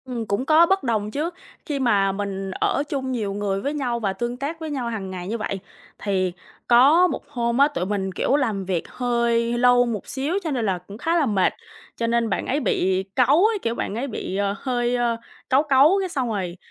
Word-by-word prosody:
Ừm, 245 -3 -4
cũng 205 +5 -1
có 315 +3 +6
bất 385 -1 +1
đồng 215 -4 -1
chứ, 300 +8 -1 0.4
khi 290 -2 -2
mà 205 -6 +3
mình 195 -1 -4
ở 280 - 0
chung 265 -2 -2
nhiều 215 -6 -2
người 200 -1 -2
với 285 +5 -2
nhau 250 -5 -1
và 200 -4 -1
tương 240 +5 -3
tác 290 +5 -4
với 320 -1 -5
nhau 260 -5 -3
hàng 205 -4 -4
ngày 180 -1 -6
như 225 +4 -2
vậy, 200 -3 -3 0.4
thì 185 -3 0 0.3
có 285 +9 +6
một - - -5
hôm 235 -1 -1
á, 280 +1 +6
tụi 285 -11 -3
mình, 190 -1 -2
kiểu, 255 - +1
làm 220 -9 0
việc 180 -3 -2
hơi 245 -1 -3
hơi 235 0 +1
lâu 245 0 +5
một 225 -5 -4
xíu 275 +4 -2
cho 320 - -2
nên 245 -5 -1
là 190 -3 0
cũng 190 +4 -11
khá 330 +7 0
là 325 -4 +3
mệt, 205 -6 +2 0.4
cho 230 - -1
nên 230 -1 +1
bạn 195 - -1
ấy 280 - +1
bị 190 -8 +1
cáu 275 - +5
ấy, 435 -1 +2
kiểu, 230 0 -1
bạn 205 - -3
ấy 250 +5 -2
bị, 210 -6 -5
ờ, 200 0 0
hơi, 245 -2 0
ơ, 240 -1 0 0.3
cáu 270 +2 +4
cáu 300 +5 +5
cái 380 -1 -2
xong 265 -7 -2
rồi 185 -5 -3
235 Hz, 235 wpm, -23 LUFS, 200-275 Hz, 0.4 s, có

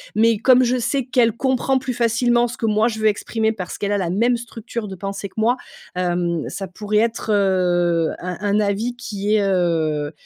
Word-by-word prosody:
mais 225 +1 +4
comme 255 +3 +5
je 250 +1 +1
sais 260 +2 -1
qu'elle 245 -2 +3
comprend 260 +2 0
plus 255 -1 -4
facilement 240 +1 +2
ce 240 - -7
que, 225 - -2
moi, 215 +1 +3
je 220 -2 -3
veux 220 - +2
exprimer 220 +1 0
parce 185 -5 -6
qu'elle 205 0 -1
a 205 - +2
la 180 -4 -1
même 235 +6 +2
structure 235 -1 -6
de 195 - -7
pensée 195 +2 -5
que - - -30
moi. 230 +3 +2 0.4
Hem, 175 -2 -1
ça 195 - -5
pourrait 210 +3 -2
être, 225 0 -1
heu, 175 -4 +2
un 180 0 -4
un 205 +1 +2
avis 200 -1 +1 0.2
qui 210 -2 -2
est, 215 - +3
heu, 165 -6 0
210 Hz, 205 wpm, -21 LUFS, 185-235 Hz, 0.4 s, comme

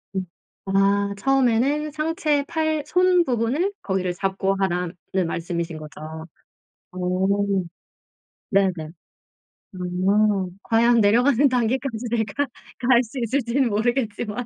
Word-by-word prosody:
음. 190 -1 -1 0.4
아 200 +1 +2
처음에는 270 +5 +2
상체 305 -1 0
팔 315 -2 -1
손 360 +1 +3
부분을 260 - 0
거기를 185 -2 -1
잡고 195 +1 -1
하라는 180 -2 -1 0.3
말씀이신 170 -1 -3
거죠? 155 +1 -9 0.7
어. - - -14 1.5
네네. 195 -2 +3 1.0
음. 185 +1 +1
과연 235 +1 +4
내려가는 245 +6 +4
단계까지 250 0 -1
내가 235 +5 -1 0.3
갈 250 -1 +4
수 245 +3 -7
있을지는 245 +1 0
모르겠지만. 225 0 -1
225 Hz, 225 characters per minute, -23 LUFS, 195-270 Hz, 1.5 s, 과연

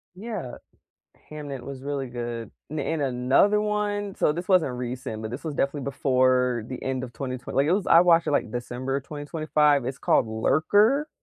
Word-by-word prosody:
Yeah. 200 - -6 0.8
Hamnet 145 -4 -6
was 135 -1 -8
really 140 -2 -3
good. 120 -2 -5 0.2
N 155 - -4
and 150 +2 -1
another 135 +11 +3
one 205 -1 -1
so, - - +2
this 175 +3 -6
wasn't 180 -9 +3
recent, 125 -3 -5
but 110 - -5
this 125 +7 -7
was 155 -3 -3
definitely 140 +1 -1
before 130 -3 +1
the 130 0 -7
end 130 -1 -2
of 120 - -10
twenty 130 +1 -4
twe 125 - -9
like, 135 +1 +3
it 160 - +2
was 195 +1 0
I 165 - +7
watched 170 -1 +4
it, - - 0
like, 120 - 0
December 125 +3 -3
of 140 - -5
2025. 150 -2 +1
It's 130 +1 -4
called - - +2
Lurker. 205 - +2
140 Hz, 190 wpm, -25 LUFS, 125-165 Hz, 0.8 s, I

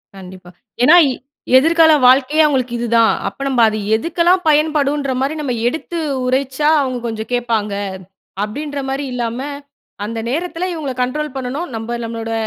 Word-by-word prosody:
கண்டிப்பா. 185 -1 -12 0.3
ஏன்னா, 305 +7 +7 0.6
எதிர்கால 320 +3 +5
வாழ்க்கையே, 275 +4 +4
அவங்களுக்கு 260 -5 0
இதுதா. 235 -1 +2 0.2
அப்ப, - - -7
நம்ம 265 -3 0
அது 215 0 -3 0.2
எதுக்கெல்லாம் 345 +7 +1
பயன்படுன்ற 295 -2 +1
மாரி, 275 +3 0
நம்ம 265 -4 -2
எடுத்து 320 +5 -4 0.3
உரைச்சா, 265 +3 0
அவங்க 255 -2 -2
கொஞ்ச 220 -1 -4
கேட்பாங்க. 225 -4 -1 0.7
அப்படின்ற 285 +6 -5
மாரி 275 +1 -2
இல்லாம, 240 -1 -3 0.7
அந்த 230 +1 -4
நேரத்தில 345 +5 -2
இவங்கள 290 -5 -4
கண்ட்ரோல் 290 +2 -4
பண்ணணும். 270 +7 -4
நம்ப, 225 +2 -6
நம்மளோட, 225 0 -5
265 Hz, 135 wpm, -17 LUFS, 235-300 Hz, 0.7 s, ஏன்னா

